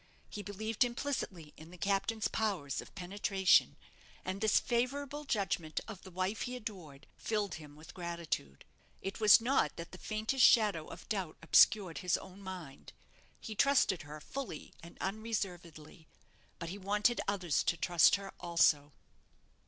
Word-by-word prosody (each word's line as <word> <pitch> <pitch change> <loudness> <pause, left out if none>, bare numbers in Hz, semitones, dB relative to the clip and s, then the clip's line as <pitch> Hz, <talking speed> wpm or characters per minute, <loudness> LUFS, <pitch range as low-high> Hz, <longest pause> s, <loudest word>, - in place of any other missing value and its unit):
He 210 - -5
believed 210 +3 -1
implicitly 240 - -3
in 160 +1 -12
the 180 - -12
captain's 200 +4 0
powers 190 -11 -1
of - - -15
penetration, 190 0 +2 0.5
and 190 +2 -3
this 220 -1 +4
favourable 275 +4 -2
judgment 185 - -1
of 215 -5 -8
the 190 - -11
wife 185 +4 -2
he 250 0 -3
adored 180 - -8
filled 210 -4 -1
him 145 -1 -13
with 155 +2 -13
gratitude. 170 - -4 0.4
It 195 +3 -4
was 215 0 +8
not 255 +4 +1
that 170 0 -8
the 185 - -10
faintest 220 +4 0
shadow 205 -9 +5
of - - -11
doubt 190 -7 -3
obscured 185 +1 +5
his 180 -2 +1
own 190 +1 -12
mind. 180 -8 -9 0.5
He 220 - -7
trusted 215 - +3
her 150 +1 -9
fully 255 - -7
and 170 - -13
unreservedly; 180 -7 -5 0.5
but 170 - -6
he 195 +3 -6
wanted 210 +4 +1
others 185 -6 +1
to 170 - 0
trust 175 -2 +5
her 195 -1 -7
also. 155 -4 +3
195 Hz, 150 wpm, -33 LUFS, 170-220 Hz, 0.5 s, was